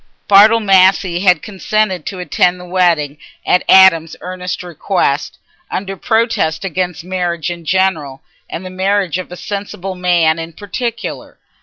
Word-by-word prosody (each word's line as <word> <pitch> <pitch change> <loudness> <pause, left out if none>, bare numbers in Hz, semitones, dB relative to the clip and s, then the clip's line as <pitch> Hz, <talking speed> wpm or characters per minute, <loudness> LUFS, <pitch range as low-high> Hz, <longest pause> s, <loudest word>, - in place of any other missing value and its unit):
Bartle 210 +3 +6
Massey 190 -3 +3
had 180 -4 +3
consented 205 -3 -2
to 190 - -5
attend 180 0 0
the 180 - -10
wedding 170 -5 0 0.3
at 180 - +3
Adam's 165 -4 +6
earnest 180 0 -5
request, 175 -4 -2 0.3
under 195 0 -4
protest 220 -6 0
against 180 -2 -3
marriage 175 -2 -3
in 170 -1 -8
general 160 -7 -1 0.3
and 180 - -6
the 185 - -7
marriage 190 -1 0
of 185 - -8
a 180 - -8
sensible 195 -1 -5
man 175 -3 +1
in 165 0 -7
particular. 230 +6 -5
180 Hz, 140 wpm, -15 LUFS, 170-195 Hz, 0.3 s, Bartle